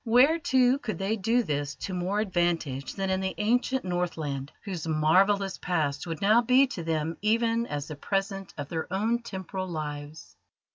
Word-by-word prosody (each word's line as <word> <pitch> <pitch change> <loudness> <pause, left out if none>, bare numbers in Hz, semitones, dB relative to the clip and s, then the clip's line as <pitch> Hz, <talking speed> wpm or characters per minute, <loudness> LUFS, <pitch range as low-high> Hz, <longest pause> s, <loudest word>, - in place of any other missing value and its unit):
Where, 255 +8 +5
too, 260 -5 +3
could 215 - -4
they 195 +4 0
do 225 +4 +2
this 145 -4 -2
to 190 - -5
more 185 +4 0
advantage 170 -9 -1
than 195 -1 -1
in 190 0 0
the 190 0 -2
ancient 245 +3 +1
Northland, 160 -6 -2
whose 180 -6 -5
marvellous 190 +6 +3
past 155 -3 -1
would 165 +2 -4
now 215 +4 +6
be 250 +3 +5
to 175 - -4
them 160 0 -2
even 230 +2 +2
as 145 -1 -4
the 155 - -6
present 195 +3 -2
of 145 -2 -4
their 165 +2 -4
own 225 +5 +1
temporal 190 -3 -5
lives? 150 -2 -6
190 Hz, 175 wpm, -28 LUFS, 160-220 Hz, -, now